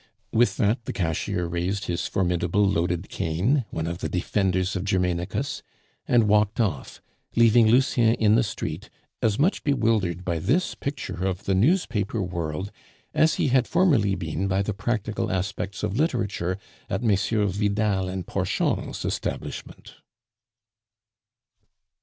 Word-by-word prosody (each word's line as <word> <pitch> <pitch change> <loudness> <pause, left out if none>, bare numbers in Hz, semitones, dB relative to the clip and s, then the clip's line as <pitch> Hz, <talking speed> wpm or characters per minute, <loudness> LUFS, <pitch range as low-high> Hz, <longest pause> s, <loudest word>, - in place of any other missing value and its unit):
With 120 +2 +3
that 115 +1 +1
the - - -4
cashier 90 +2 -1
raised 90 +4 -2
his 85 0 -2
formidable 90 +2 +1
loaded 90 -1 0
cane, 105 - 0
one 80 - -3
of 85 +1 -4
the - - -3
defenders 95 +1 0
of 95 - -2
Germainicus, 90 -3 -1 0.5
and 120 -3 +4
walked 105 +1 +2
off, 95 - -2 0.3
leaving 115 -1 +6
Lucien 120 -1 +4
in 105 -1 +3
the 115 - +5
street, 110 - -4 0.3
as 110 -2 +2
much 170 +8 +1
bewildered 110 - +1
by 85 -2 -1
this 160 - +1
picture 140 -10 -5
of 95 -1 -2
the 100 - 0
newspaper 115 - +1
world 90 0 -3 0.4
as 155 +1 +3
he - - +1
had 130 -1 +3
formerly 140 - +3
been 90 +2 -3
by 95 +1 +1
the 105 - -2
practical 110 +1 -2
aspects 95 +1 -3
of 105 -1 -1
literature 105 - 0 0.3
at - - -2
Messrs. 105 -2 +1
Vidal 100 -2 0
and 95 -1 -4
Porchon's - - -1
establishment. - - -5
100 Hz, 135 wpm, -25 LUFS, 90-115 Hz, 0.5 s, leaving